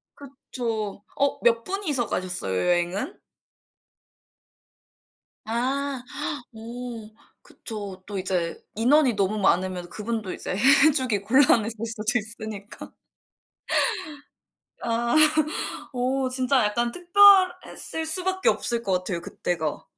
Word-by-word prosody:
그쵸. 230 -7 -5
어 280 0 +1
몇 230 -1 +3
분이서 310 - -2
가셨어요, 180 - -3
여행은? 175 - 0 2.3
아. 260 +3 -1 0.5
어 230 -1 -7 0.3
그쵸. 200 -4 -8
또 200 -1 -5
이제 180 -3 -2
인원이 255 +3 +4
너무 200 +1 0
많으면 185 -2 +1
그분도 215 -1 -4
이제 - - -4 0.3
해주기 260 -8 +2
곤란해질 230 -2 +3
수도 225 +1 0
있으니까. 215 -1 -8 1.9
아. 235 +1 0 0.8
어 260 +1 0
진짜 255 -1 +2
약간 235 +3 0
특별했을 365 -2 +4
수밖에 375 +6 0
없을 235 - 0
것 195 - -2
같아요, 180 -1 -1
그때가. 165 -3 -3
230 Hz, 205 characters per minute, -25 LUFS, 200-265 Hz, 2.3 s, 인원이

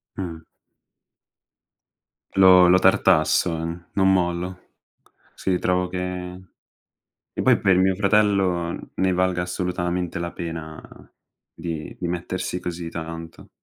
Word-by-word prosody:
Mh. 85 -4 -5 2.0
Lo 95 -2 +7
lo 90 - +6
tartasso, 85 -3 +3 0.4
non 95 -1 +3
mollo. 90 0 -2 0.6
Sì, 95 -2 -1
trovo 90 0 +1
che 90 0 -5 0.9
e - - -3
poi - - +4
per 95 -2 +3
mio 95 +1 +3
fratello 95 -4 +1
ne 95 0 +1
valga 90 -1 +1
assolutamente 90 -1 -2
la 85 0 -4
pena 80 -2 -6 0.7
di 80 -2 -6
di 90 - -3
mettersi 90 +1 -3
così 85 -1 -5
tanto 80 0 -8
90 Hz, 105 wpm, -23 LUFS, 85-95 Hz, 2.0 s, Lo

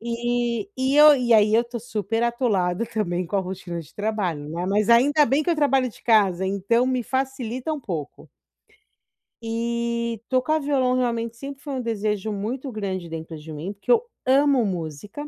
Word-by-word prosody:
E 235 -1 -1
e 265 +2 +1
eu 300 0 +9
e 240 -2 +1
aí, 215 -1 +5
eu 230 - +5
estou 240 -1 -7
super 225 0 -2
atolada, 230 -6 0
também, 185 -6 -2
com 200 - -2
a - - +2
rotina 180 -2 -6
de 150 - -15
trabalho, 195 -9 -2
né, 170 +3 -3
mas 205 +3 +1
ainda 285 +6 +5
bem 285 +2 +1
que - - -5
eu - - +3
trabalho 270 -4 +2
de 230 - -16
casa, 195 -5 +3
então 200 +6 +1
me 255 -1 0
facilita 260 +2 -3
um 300 - -4
pouco. 165 - -6 1.1
E 235 0 -2
tocar 260 +5 +1
violão, 270 -3 +1
realmente, 235 -2 -1
sempre 275 +2 -8
foi 290 -2 -6
um 260 - -2
desejo 215 -2 -2
muito 245 +7 -4
grande 190 -5 -4
dentro 160 0 -7
de 155 +1 -10
mim, 155 +6 -5
porque 205 - -3
eu 470 -2 +5 0.2
amo 270 -2 +4
música, 185 - -5
230 Hz, 180 wpm, -24 LUFS, 195-255 Hz, 1.1 s, eu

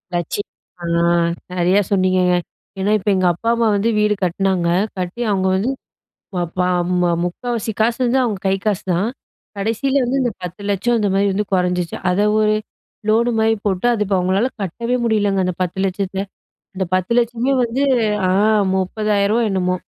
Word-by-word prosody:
லட்சியம். 175 +4 -3 0.3
அ - - -8 0.8
நிறையா 180 +3 +3
சொன்னீங்கங்க. 185 -2 +3 0.4
ஏன்னா, 195 +2 +1
இப்ப 205 - -2
எங்க 185 -1 +1
அப்பா, 225 +7 -3
அம்மா 230 -1 +2
வந்து 205 +3 +1
வீடு 210 0 +3
கட்டுனாங்க. 185 -1 +1 0.3
கட்டி 185 +6 -4
அவுங்க 190 -1 +1
வந்து 200 +7 0 0.7
ப 180 - -1 0.2
ப - - +2 0.4
ம 175 -1 +2
முக்காவாசி 225 +5 -3
காசுவந்து 240 +3 +2
அவுங்க 215 -6 -1
கை - - +2
காசுதான். 195 -1 0 0.5
கடைசியில 245 +7 0
வந்து 255 +3 0
இந்த 240 -2 0
ரூ.10,00,000 200 +6 -1
அந்த 210 -2 +1
மாரி 200 +1 +2
வந்து 205 +2 0
குறைஞ்சிச்சு. 180 -2 0
அத 180 +2 +1 0.2
ஒரு 215 0 +3 0.6
லோனுமாரி 225 0 +3
போட்டு 190 +2 0
அது 220 -3 0
இப்ப 195 - 0
அவங்களால 190 +6 +1
கட்டவே 235 +7 -2
முடியலங்க. 205 -4 +1
அந்த 180 - -1
ரூ.10,00,000த்த. 190 +1 -2 0.6
அந்த 190 0 -1
ரூ.10,00,000மே 235 +6 +1
வந்து 240 +4 -1 0.5
ஆ - - +2 0.5
ரூ.30,000வா 210 +3 +1
என்னமோ! 185 -1 0
200 Hz, 145 wpm, -19 LUFS, 185-230 Hz, 0.8 s, நிறையா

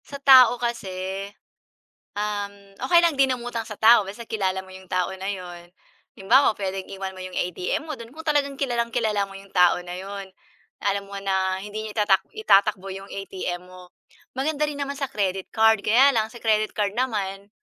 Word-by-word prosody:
Sa 280 - -8
tao 260 -3 +7
kasi, 195 -5 -4 0.9
um, 205 -1 -2 0.4
okey 345 - +7
lang 335 - +2
din 265 -1 +4
umatang 240 -2 -5
sa 210 - -7
tao 230 +1 +7
basta 210 +5 -8
kilala 190 -4 -1
mo 190 - -14
yung 190 -1 -13
tao 185 0 0
na 190 +1 -4
'yon, 175 -3 -7 0.5
halimbawa 235 +7 +4
puwedeng 195 -1 -4
iwan 190 -1 -5
mo 185 - -10
yung 185 0 -7
ATM 180 - -2
mo 310 - -4
do'n 230 0 -10
kung 320 +1 -10
talagang 285 -3 +1
kilalang-kilala 235 -5 0
mo 195 - -11
yung 195 0 -15
tao 180 -2 +5
na 175 - -6
'yon, 195 +1 -7 0.5
alam 200 0 -1
mo 200 0 -7
na 190 -1 0
hindi 210 +2 -6
niya 215 0 -8
itatak 195 -2 +3
itatakbo 200 - +2
yung 195 +1 -9
ATM 185 -2 -4
mo. 180 0 -14 0.4
Maganda 300 +2 0
rin 290 -1 -5
naman 280 0 -3
sa 275 - -1
credit 190 -2 -2
card 220 -1 +4
kaya 255 +6 +6
lang 220 -2 0
sa 240 - -11
credit 215 -1 +1
card 205 -1 -1
naman, 200 -5 -2
205 Hz, 185 wpm, -24 LUFS, 190-235 Hz, 0.9 s, tao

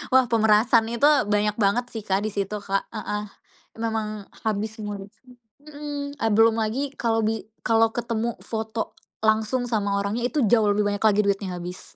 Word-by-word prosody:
Wah, 260 - +6
pemerasan 225 +1 +4
itu 285 +5 +4 0.3
banyak 210 0 +2
banget 210 +5 +2
sih, 225 -3 -6
Kak, 195 +2 +1
di 215 - -2
situ, 200 +1 -2
Kak, 195 0 0
heeh, 210 0 -3 0.6
memang 220 -1 -1 0.4
habis 215 +1 -2
semua 205 -1 -4
duit, 195 +1 -10 0.5
hmm. 290 -1 -6 0.2
Belum 225 0 +5
lagi 265 +6 -2
kalau 225 -1 0
bi 225 0 -1 0.2
kalau 225 0 +4
ketemu 235 -1 -2
foto 220 0 -4 0.3
langsung 220 +3 +1
sama 200 -3 0
orangnya, 205 +4 -2
itu 305 - -2
jauh 215 -3 +5
lebih 205 0 +1
banyak 205 +1 -2
lagi 210 -1 +4
duitnya 200 -1 0
habis. 180 +1 -9
220 Hz, 165 wpm, -24 LUFS, 205-230 Hz, 0.6 s, Wah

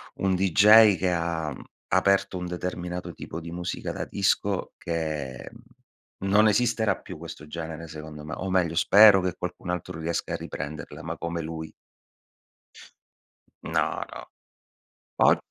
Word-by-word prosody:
un 95 -1 +1
DJ 100 +3 +7
che 90 +2 0
ha 85 -3 -1 0.4
aperto 100 -1 +2
un 90 - -4
determinato 90 0 -4
tipo 80 - -7
di 85 0 -8
musica 90 +1 -4
da - - -4
disco - - 0
che 75 -6 -4 0.7
non 105 +3 +4
esisterà 110 0 +2
più - - -9
questo 75 - -9
genere 80 +1 -6
secondo 75 -1 -9
me, 75 - -6
o 95 - -4
meglio, 90 -3 +1
spero 100 +3 +7
che 90 -1 -2
qualcun 90 0 -6
altro 90 -1 -4
riesca 85 +1 -2
a - - 0
riprenderla, 70 +2 -7
ma - - -5
come 85 0 -3
lui 80 0 -6 1.9
No - - 0 0.3
no. - - -8 0.9
Poi - - +5
85 Hz, 135 wpm, -26 LUFS, 80-95 Hz, 1.9 s, DJ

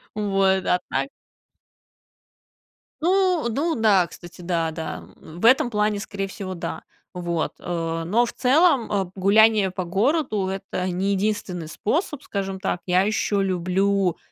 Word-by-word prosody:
Вот. 195 -2 +1
А 180 - +2
так - - -1 1.9
Ну 365 -3 +2
ну 305 +8 -1
да, 210 -5 +4
кстати, 175 +1 -13
да, 170 -2 -1
да, 160 0 -6 0.2
м, 160 +2 -11
в 225 - -1
этом 260 +2 +5
плане, 210 -2 0
скорее 200 -1 -4
всего, 190 -1 -6
да. 170 - -5 0.3
Вот. 175 -2 -2
А, 165 -1 -3
но 220 +9 +2
в 235 - -7
целом, 275 -1 +3
а, 195 -3 0
гуляние 205 +1 +4
по 185 0 -4
городу- 210 - 0
это 190 -1 -4
не 185 +3 -1
единственный 190 -4 -2
способ, 295 - -2
скажем 195 -1 -4
так. 185 -2 -2
Я 180 0 +3
еще 205 -1 0
люблю, 190 0 +1
195 Hz, 140 wpm, -23 LUFS, 180-220 Hz, 1.9 s, этом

